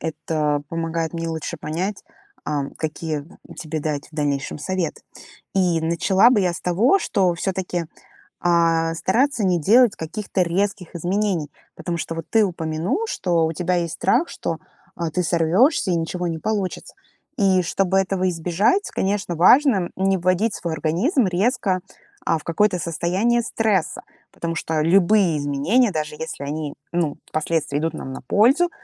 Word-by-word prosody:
Это 150 -2 -1
помогает 165 0 -2
мне 165 0 -3
лучше 160 +1 -4
понять, 175 +7 -4 0.4
ам, 145 -2 -2
какие 155 -1 -3 0.3
тебе 155 -2 -4
дать 150 -1 -3
в - - -18
дальнейшем 145 -2 -2
совет. 175 +2 -2 0.6
И 180 -4 +2
начала 190 +7 +4
бы 245 - +3
я 180 -2 +1
с 170 - -6
того, 215 - +3
что 190 - +1
всё-таки, 180 -2 -2 0.5
а, 165 -1 +2
стараться 235 - +1
не 180 -2 +2
делать 230 - +5
каких-то 190 +3 -3
резких 185 +1 -1
изменений. 175 -3 -1 0.2
Потому 170 -1 -4
что 165 - -4
вот 165 -1 -5
ты 225 -1 +5
упомянул, 165 - -2
что 170 - +1
у 160 - -2
тебя 180 +3 0
есть 170 -2 -1
страх, 340 - +1
что, 165 - -4 0.4
а, 170 -2 -3
ты 180 - 0
сорвёшься 180 - +3
и - - +2
ничего 170 +2 -2
не 165 -1 -3
получится. 200 -1 -3 0.4
И 190 -3 +3
чтобы 190 +2 0
этого 190 -1 0
избежать, 180 - +1
конечно, 195 -3 -1
важно 200 - +5
не 190 0 +1
вводить 185 +5 +1
свой 170 -2 -3
организм 185 - +1
резко, 185 0 0 0.4
а, 165 - +2
в 150 - -11
какое-то 180 +2 +1
состояние 185 +9 0
стресса. 215 -7 0 0.3
Потому 165 0 -4
что 160 -1 -1
любые 180 0 +4
изменения, 150 - +2
даже 150 -2 -3
если 155 -2 -6
они, 150 0 -4 0.2
ну, 170 -4 -1 0.2
последствия 155 -2 0
идут 165 +1 -1
нам 130 - -6
на - - -7
пользу, 260 - +3
175 Hz, 155 wpm, -22 LUFS, 160-195 Hz, 0.6 s, делать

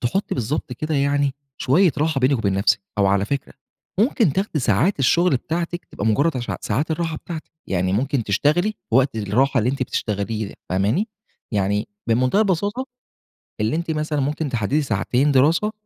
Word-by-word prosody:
تحُطي 190 +12 -1
بالضبط 125 +2 -2
كده 155 +5 -3
يعني 140 0 +1 0.2
شوية 165 +4 +3
راحة 155 -3 +1
بينِك 130 +1 +3
وبين 100 -3 0
نفسِك، 100 0 +2 0.2
أو 100 - +4
على 100 +1 +2
فكرة 140 +4 -3 0.5
ممكن 220 - +3
تاخدي 190 -4 -1
ساعات 125 - +2
الشُّغل 170 +3 +3
بتاعتِك، 170 +4 -3
تبقى 105 - -5
مجرد 140 +7 +2
عش 120 - -3
ساعات 155 +4 -1
الراحة 160 0 -1
بتاعتِك، 160 0 -8 0.2
يعني 95 0 0
ممكن 125 +2 0
تشتغلي 155 - +1 0.2
وقت 130 +1 +3
الراحة 125 +6 +1
اللي 120 +3 +2
أنتِ 135 -1 -2
بتشتغليه، 105 -2 -3
فاهماني؟ 105 - +1 0.4
يعني 105 +1 0 0.2
بمُنتهى 130 - +2
البساطة، 205 +6 0 0.8
اللي 110 +7 +1
أنتِ 170 0 -2
مثلًا 155 -1 -1
ممكن 145 +2 -1
تحددي 125 +5 0
ساعتين 130 +4 +1
دراسة، 160 +11 +3
140 Hz, 160 wpm, -22 LUFS, 110-160 Hz, 0.8 s, أو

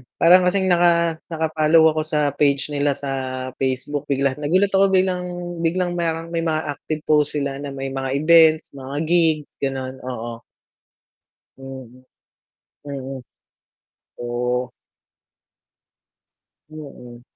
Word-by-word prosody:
parang 180 +2 +5
kasing 190 0 +1
naka 170 -2 +3
naka 160 -1 -2
follow 160 +1 +4
ako 155 - -2
sa 150 -2 0
page 140 -1 +1
nila 145 -1 0
sa 140 -1 -4 0.5
Facebook 135 +2 -2
biglang, 140 0 0
nagulat 185 +7 +2
ako 195 0 +4
biglang 185 -1 +1 0.3
biglang 175 +2 0
may 170 - 0 0.2
may 170 - -1
mga 155 0 0 0.2
active 155 -1 -5
post 150 -1 +2
sila 140 -1 -2
na 145 - -6
may 135 0 -4
mga 135 0 -3 0.2
events, 160 -1 +5
mga 135 0 -8
gigs 160 -3 +1
gano'n 130 -1 -4
oo. 120 -2 -6 1.3
Mm, 135 -1 -9 1.0
mm. 135 -1 -6 1.0
Oo. 125 +1 -2 2.0
Oo. 125 -6 -11
150 Hz, 120 wpm, -21 LUFS, 135-165 Hz, 2.0 s, parang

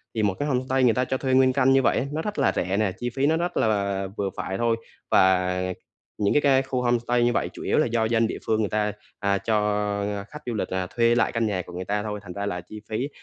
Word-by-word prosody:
Thì 110 - 0
một 100 -2 +2
cái 145 - -1
homestay 130 -1 +1
người 120 -2 +5
ta 125 +2 0
cho 130 - -1
thuê 130 0 -1
nguyên 130 0 +5
căn 135 0 +4
như 135 - +5
vậy - - +2
á, - - 0
nó 155 +2 -2
rất 210 +4 -4
là - - +3
rẻ 95 +2 0
nè, 105 -2 +1
chi 120 - -2
phí 135 +3 -1
nó 160 +2 +3
rất 175 +1 -2
là 100 -3 0
vừa 100 -1 -1
phải 95 - -3
thôi. 115 0 +1 0.3
Và 90 -1 +4 0.6
những 100 -1 +1
cái 150 - +4
cái 135 -2 +4
khu 130 -1 -2
homestay 120 0 +1
như 120 0 +2
vậy - - 0
chủ - - -8
yếu - - +1
là - - +4
do 115 -1 +1
dân 115 0 +2
địa - - -4
phương 110 -1 +1
người 105 -3 0
ta, 105 0 0 0.3
à, 100 -1 +1
cho 110 +2 -1 0.7
khách 150 - -9
du 120 - -3
lịch 110 - -3
là 95 -1 -1
thuê 115 0 +4
lại 120 - +2
căn 115 -1 0
nhà 95 -3 -1
của 90 - -12
người 90 +1 -5
ta 105 +1 -1
thôi, 105 -1 -4
thành 90 -2 -8
ra 100 +1 -3
là 90 -3 -3
chi 105 +4 -11
phí 120 +6 -2
115 Hz, 280 wpm, -25 LUFS, 100-130 Hz, 0.7 s, người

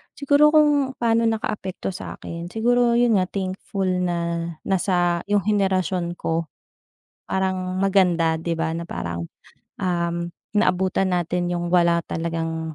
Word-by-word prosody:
siguro 295 +2 +4
kung 290 -3 +4
pa'no 230 -1 +2
nakaapekto 215 -5 -2
sa - - -6
akin, 170 +1 -6
siguro 240 +1 +3
yun 235 -3 +4
nga 185 - +1
thankful 190 0 -3
na 170 -2 -1 0.2
nasa 175 -2 +1
yung 205 0 +2
henerasyon 185 -4 0
ko, 165 0 -1 0.8
parang 185 -1 -1
maganda 180 -4 +3
'di 170 0 -1
ba 165 0 -1
na 170 - -4
parang, 85 0 -4 0.5
um, 170 -1 -1 0.3
naabutan 190 -2 +2
natin 175 0 -1
yung 175 0 -2
wala 170 -1 +4
talagang 165 -1 -3
185 Hz, 125 wpm, -23 LUFS, 170-205 Hz, 0.8 s, siguro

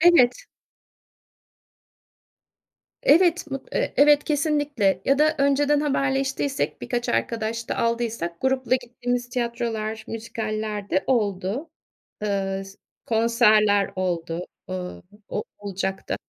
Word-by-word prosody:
Evet. 340 - +5 2.6
Evet 350 -6 +4
mut 270 0 -5
eee, - - 0
evet, 290 +1 +6
kesinlikle. 290 - +1
Ya 275 0 +3
da 310 +1 +4
önceden 285 +1 +3
haberleştiysek, 275 -1 0
birkaç 245 -1 -2
arkadaş 230 0 -1
da - - -2
aldıysak 230 -7 -1
grupla 260 -1 +1
gittiğimiz 245 0 -2
tiyatrolar, 235 -3 -3
müzikaller 215 -2 -4
de 190 - +1
oldu. 215 - 0 0.5
Iıı, 195 -1 -1
s 195 0 -14 0.3
konserler 215 -3 +4
oldu, 175 -1 -2 0.2
ııı, 180 -1 -5 0.3
o-olacak 195 -2 -4
da. - - 0
235 Hz, 100 wpm, -24 LUFS, 205-275 Hz, 2.6 s, evet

